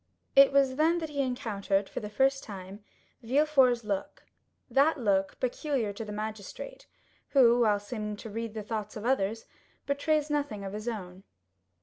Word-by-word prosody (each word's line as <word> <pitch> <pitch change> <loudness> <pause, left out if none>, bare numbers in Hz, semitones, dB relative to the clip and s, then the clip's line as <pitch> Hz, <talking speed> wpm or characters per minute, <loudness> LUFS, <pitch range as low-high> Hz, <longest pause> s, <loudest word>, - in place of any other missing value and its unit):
It 275 0 +8
was 270 -2 +3
then 325 +3 +3
that 320 -2 -3
he 285 -1 -1
encountered 205 -6 -1
for - - -5
the 210 - -6
first 270 +5 +2
time 195 0 -9 0.4
Villefort's 260 -1 +3
look,—that 270 +8 -2
look 195 -6 0
peculiar 255 -4 -1
to 215 - -6
the 210 - -7
magistrate, 215 - -6 0.5
who, 245 -3 +6
while 210 -3 +3
seeming 210 0 -5
to 220 - -9
read 225 0 -4
the 215 - -4
thoughts 210 -1 -4
of 215 - -7
others, 225 -3 0 0.4
betrays 295 +1 0
nothing 285 -9 -2
of 195 - -5
his 215 +2 -6
own. 190 -5 -5
230 Hz, 155 wpm, -29 LUFS, 210-275 Hz, 0.5 s, It